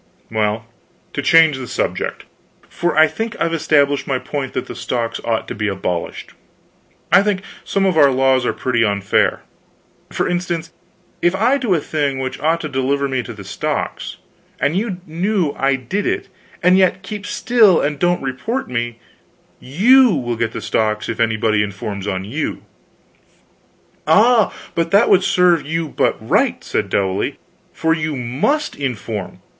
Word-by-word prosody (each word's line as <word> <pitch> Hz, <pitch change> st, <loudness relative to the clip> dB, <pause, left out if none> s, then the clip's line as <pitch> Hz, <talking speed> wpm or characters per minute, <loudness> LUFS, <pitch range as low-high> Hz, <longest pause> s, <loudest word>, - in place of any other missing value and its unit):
"Well, 110 Hz, 0 st, 0 dB, 0.5 s
to -, -, -2 dB
change 160 Hz, -4 st, +5 dB
the 130 Hz, -, -6 dB
subject -, -, -3 dB, 0.4 s
for 175 Hz, -3 st, -2 dB
I 155 Hz, -, +8 dB
think 225 Hz, +8 st, -4 dB
I've 165 Hz, 0 st, 0 dB
established 145 Hz, -3 st, +2 dB
my 135 Hz, -, +1 dB
point 135 Hz, 0 st, -4 dB
that -, -, -2 dB
the -, -, -8 dB
stocks 115 Hz, -2 st, -3 dB
ought 115 Hz, -1 st, -1 dB
to -, -, -4 dB
be 105 Hz, 0 st, -2 dB
abolished. 90 Hz, -3 st, -3 dB, 0.8 s
I -, -, +7 dB
think 200 Hz, -1 st, -1 dB, 0.2 s
some 195 Hz, 0 st, 0 dB
of 185 Hz, -3 st, +2 dB
our 140 Hz, -2 st, +7 dB
laws 130 Hz, -1 st, +2 dB
are -, -, +1 dB
pretty 120 Hz, -2 st, 0 dB
unfair. 100 Hz, -2 st, +1 dB, 0.7 s
For -, -, -1 dB
instance, 175 Hz, -2 st, -3 dB, 0.5 s
if 175 Hz, +2 st, +2 dB
I 245 Hz, +8 st, +2 dB
do 225 Hz, -8 st, +1 dB
a -, -, +1 dB
thing 145 Hz, -3 st, -1 dB
which 130 Hz, 0 st, -4 dB
ought 165 Hz, +2 st, +1 dB
to 155 Hz, -, -3 dB
deliver 140 Hz, 0 st, 0 dB
me 130 Hz, -2 st, -1 dB
to 120 Hz, -, -8 dB
the 105 Hz, -3 st, -9 dB
stocks, 100 Hz, -, -4 dB, 0.4 s
and 150 Hz, -, +1 dB
you 195 Hz, -2 st, -2 dB
know 175 Hz, 0 st, -1 dB
I 135 Hz, 0 st, +1 dB
did 135 Hz, -, -3 dB
it -, -, -2 dB, 0.3 s
and 180 Hz, +1 st, +5 dB
yet 185 Hz, 0 st, +2 dB
keep 205 Hz, 0 st, -6 dB
still 220 Hz, -8 st, +4 dB
and 145 Hz, -1 st, -1 dB
don't 175 Hz, -2 st, +1 dB
report 135 Hz, -, -3 dB
me, 120 Hz, -1 st, -3 dB, 0.6 s
you 230 Hz, -, +4 dB
will 120 Hz, -4 st, -2 dB
get 115 Hz, 0 st, -1 dB
the -, -, -6 dB
stocks 105 Hz, 0 st, -1 dB
if 115 Hz, -, -4 dB
anybody 110 Hz, -2 st, +2 dB
informs 100 Hz, 0 st, -4 dB
on 95 Hz, -1 st, -2 dB
you." 105 Hz, -, -4 dB, 1.4 s
"Ah, 215 Hz, +6 st, +5 dB, 0.2 s
but 165 Hz, 0 st, 0 dB
that 200 Hz, +6 st, +4 dB
would 190 Hz, -, +5 dB
serve 180 Hz, -4 st, +3 dB
you 160 Hz, +1 st, -2 dB
but -, -, +1 dB
right," -, -, +1 dB
said -, -, -2 dB
Dowley, 95 Hz, -1 st, -1 dB, 0.3 s
"for 160 Hz, 0 st, +1 dB
you 155 Hz, -2 st, -2 dB
must 135 Hz, -, -1 dB
inform. 115 Hz, -7 st, -5 dB
145 Hz, 165 wpm, -19 LUFS, 120-180 Hz, 1.4 s, I